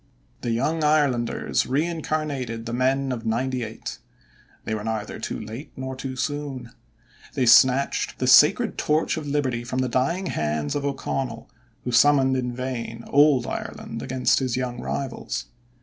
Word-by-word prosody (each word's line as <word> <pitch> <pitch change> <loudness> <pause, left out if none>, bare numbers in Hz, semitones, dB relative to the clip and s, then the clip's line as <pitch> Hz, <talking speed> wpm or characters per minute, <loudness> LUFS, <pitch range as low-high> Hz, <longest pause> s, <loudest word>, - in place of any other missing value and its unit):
The 120 - -3
Young 145 +8 0
Irelanders 145 -6 +1
reincarnated 145 -5 -2
the 115 - -4
men 130 +2 +1
of 120 -3 -4
"ninety 125 +3 -1
eight." 110 0 -7 0.7
They - - -2
were 105 -1 -3
neither 110 -1 -3
too - - -4
late 110 +6 -8
nor 130 0 -5
too 130 0 -5
soon. 135 -3 -4 0.6
They 130 - +2
snatched 130 +3 +4
the - - -1
sacred - - +5
torch 155 +1 +1
of 155 -2 -5
Liberty 135 -5 -1
from 125 +2 -4
the 130 0 +1
dying 135 +10 0
hands 75 - -1
of 145 - -2
O'Connell, 130 -4 -3 0.3
who 125 - -3
summoned 135 +1 +5
in 125 -1 -1
vain 120 -2 -4
old 140 -3 +5
Ireland 115 0 -5
against 130 -1 +1
his 130 -2 -1
young 125 -1 -3
rivals. 135 -2 -4
130 Hz, 150 wpm, -24 LUFS, 120-140 Hz, 0.7 s, sacred